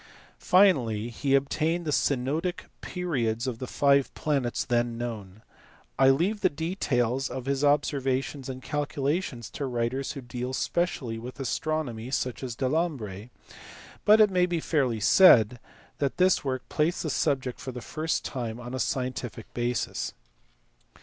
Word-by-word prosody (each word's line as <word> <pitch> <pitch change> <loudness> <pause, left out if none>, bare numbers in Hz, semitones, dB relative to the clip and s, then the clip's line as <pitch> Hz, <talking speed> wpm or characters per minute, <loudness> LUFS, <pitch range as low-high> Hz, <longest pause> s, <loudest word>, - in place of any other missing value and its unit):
Finally 125 - +3
he 135 +3 +1
obtained 155 +5 0
the 150 - -1
synodic 145 +7 0 0.2
periods 125 -10 -2
of 125 -3 -3
the 130 - -5
five 140 0 +3
planets 140 -6 -1
then 120 -1 0
known. 110 -4 -6 0.6
I 135 0 +7
leave 180 +10 +2
the - - +4
details 135 -6 -1
of 130 -1 -5
his 140 +1 -1
observations 140 -2 0
and 130 -1 -7
calculations 145 -3 -2
to 140 - -4
writers 125 +2 -2
who 140 - -7
deal 125 +1 -5
specially 130 -8 -1
with 125 +4 -9
astronomy 130 -3 -2
such 130 -2 -2
as 125 -3 -4
Delambre; 130 - -2 0.7
but 215 +1 +6
it 210 -2 +6
may 180 -1 +3
be 175 -2 -1
fairly 135 -8 0
said 120 - +6 0.4
that 140 -2 -1
this 185 0 +3
work 130 -2 -3
placed 160 +4 0
the 155 - -2
subject 135 -4 0
for 130 +1 -6
the 125 - -7
first 155 +6 -2
time 120 -3 -4
on 120 +1 -7
a 130 - -3
scientific 125 -4 -3
basis. 120 0 -2
135 Hz, 145 wpm, -27 LUFS, 120-155 Hz, 0.7 s, I